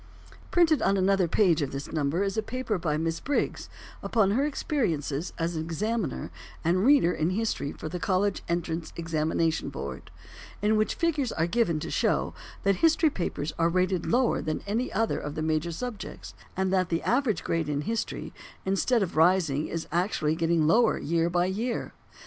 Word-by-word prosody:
Printed 325 -4 +4
on 195 - +2
another 190 -1 +3
page 170 -3 +3
of 140 - -2
this 140 +1 -6
number 155 +4 0
is 195 0 -1
a 220 - +1
paper 225 -3 -3
by 155 -3 0
Miss 165 +1 -1
Briggs 285 - -1 0.3
upon 210 -5 +2
her 270 +7 +2
experiences 170 - -1
as 170 0 -1
an 160 - -2
examiner 195 - -2 0.3
and 180 +3 +2
reader 265 -9 +5
in 155 +2 0
history 190 -7 -1
for - - -7
the 180 +3 -4
College 195 +2 +1
Entrance 170 -1 -2
Examination 165 -1 0
Board, 70 - -7 0.5
in 210 +1 +2
which 215 0 +1
figures 300 -7 0
are 165 - 0
given 175 -4 +1
to - - -5
show - - +1 0.3
that 195 -1 +3
history 325 -1 +4
papers 160 - -3
are 165 0 +4
rated 185 0 0
lower 245 0 +2
than 155 -1 -3
any 225 +5 -1
other 225 +3 0
of 150 - -5
the 155 - -2
major 155 +1 0
subjects, 220 +4 -6 0.2
and 190 0 +1
that 185 -2 +2
the 165 0 -1
average 245 -5 +1
grade 165 -2 -1
in 145 -1 -1
history, 225 +9 -3 0.3
instead 195 +4 +2
of 180 - -4
rising, 160 -3 +3
is 165 -1 -4
actually 170 -3 +1
getting 165 -1 +2
lower 225 +8 +4
year 165 +2 0
by 175 0 +2
year. 220 +6 -2
180 Hz, 180 wpm, -27 LUFS, 160-220 Hz, 0.5 s, reader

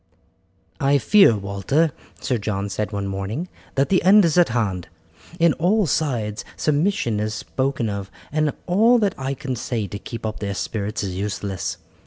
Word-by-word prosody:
"I 140 +1 +3
fear, 140 - +5
Walter," 100 - 0 0.3
Sir 125 -3 -1
John 100 -1 -2
said 105 +1 -3
one 100 -1 -3
morning, 100 - -4 0.3
"that 135 +1 +2
the 185 - +3
end 195 +2 +6
is 165 - +1
at 175 -5 +5
hand. 105 -7 -1 0.5
On 170 -1 +5
all 200 +5 +2
sides 120 -9 -1
submission 150 - +1
is 105 0 -2
spoken 130 +1 -2
of, 100 -2 -4 0.2
and 155 -1 +1
all 225 +7 +4
that 205 -5 +1
I 135 +1 -3
can 130 -1 -4
say 115 -2 -2
to 100 +1 -6
keep 115 +1 -7
up 110 0 -4
their 100 -1 -3
spirits 105 +1 -3
is 95 -2 -3
useless. 100 -1 -3
120 Hz, 170 wpm, -22 LUFS, 100-160 Hz, 0.5 s, end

